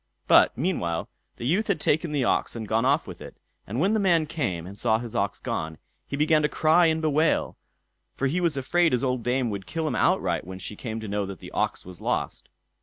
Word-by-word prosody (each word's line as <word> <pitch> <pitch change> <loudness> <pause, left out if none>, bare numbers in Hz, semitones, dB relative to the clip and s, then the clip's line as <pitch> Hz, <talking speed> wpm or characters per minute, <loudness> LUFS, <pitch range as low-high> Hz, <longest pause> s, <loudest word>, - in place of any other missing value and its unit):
But, - - +5
meanwhile 100 - -1 0.3
the 120 - -7
youth 185 - +1
had 200 - +1
taken 155 +1 +1
the 145 -3 0
ox 120 - 0
and 110 -2 -5
gone 115 +3 +1
off 140 +4 +2
with 90 -4 -10
it; - - -10 0.3
and 115 +6 -3
when 195 +7 +2
the 220 - +2
man 170 -5 +3
came 110 - -3
and 95 +2 -9
saw 110 +1 +2
his 115 -1 -7
ox 100 0 -1
gone, 80 0 -4 0.3
he 140 - -4
began 155 +1 +3
to 150 - +1
cry 165 +3 +4
and 160 0 0
bewail, 155 +1 +1 0.6
for 140 - -1
he 165 +7 0
was 165 -5 +1
afraid 165 +4 +2
his 125 - +1
old 130 -2 0
dame 125 0 0
would 100 -2 -6
kill 160 -1 -2
him 130 - -1
outright - - +1
when 95 +1 -8
she 95 +3 -6
came 110 +1 -5
to 110 - -6
know 100 -1 -2
that 95 -1 -7
the - - -11
ox - - -1
was 90 -1 -11
lost. - - -2
130 Hz, 235 wpm, -26 LUFS, 105-160 Hz, 0.6 s, But